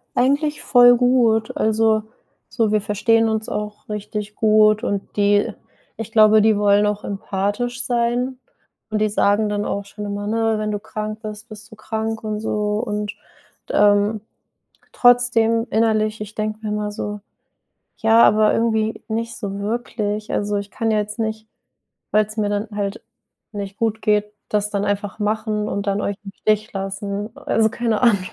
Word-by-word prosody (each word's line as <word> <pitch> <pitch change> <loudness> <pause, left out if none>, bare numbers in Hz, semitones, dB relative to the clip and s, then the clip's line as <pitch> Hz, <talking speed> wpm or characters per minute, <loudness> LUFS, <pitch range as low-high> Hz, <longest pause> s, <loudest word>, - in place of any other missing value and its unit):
Eigentlich 285 +4 +1
voll 245 -1 +6
gut. 235 -3 +2
Also, 220 0 +2 0.5
so 225 -3 0
wir 215 -1 +2
verstehen 225 +2 +2
uns 220 0 -2
auch 210 0 -5
richtig 210 0 -5
gut 215 -1 +4
und 200 -1 -3
die 205 0 +3 0.5
ich 225 0 -5
glaube, 215 -1 +6
die 220 -1 +4
wollen 205 0 +4
auch 210 0 -1
empathisch 205 +5 -2
sein 245 +1 0 0.5
und 215 - 0
die 215 0 +2
sagen 205 +1 +2
dann 205 0 -2
auch 200 0 -3
schon 210 +1 -8
immer, 205 0 -4
ne: 225 0 +1
„Wenn 215 0 -2
du 205 - -2
krank 215 0 -5
bist, 215 +2 -8
bist 215 0 -11
du - - -11
krank" 220 +1 -4
und 215 -1 -3
so. 210 -1 -1
Und, 210 -1 -3 0.6
ähm, 205 +1 +3 0.7
trotzdem 235 -2 +3
innerlich 215 -1 +1
ich 210 0 -7
denke 215 0 -3
mir 215 - -4
immer 210 0 -2
so: 210 0 -5 0.8
„Ja, 225 +1 +5
aber 215 0 +5
irgendwie 220 -1 0
nicht 230 +1 -3
so 200 -2 -5
wirklich. 215 -1 -3
Also, 205 0 -1
ich 200 0 -5
kann 225 -1 -2
ja 215 - +2
jetzt 210 +2 -5
nicht, 220 0 -3 0.6
weil's 215 +1 +1
mir 210 -1 +1
dann 205 +1 -2
halt 200 0 -3 0.5
nicht 200 -1 -6
gut 220 -1 -1
geht, 210 -1 +1 0.2
das 210 0 0
dann 200 0 -1
einfach 205 +1 -2
machen 210 0 -1
und 200 +1 -3
dann 200 +1 0
euch 200 -1 -2
im 195 - -8
Stich 215 +1 +1
lassen“, 200 +2 -4
also 220 0 +1
keine 230 -3 -1
Ahnung. 230 -5 +5
215 Hz, 165 wpm, -21 LUFS, 205-225 Hz, 0.8 s, voll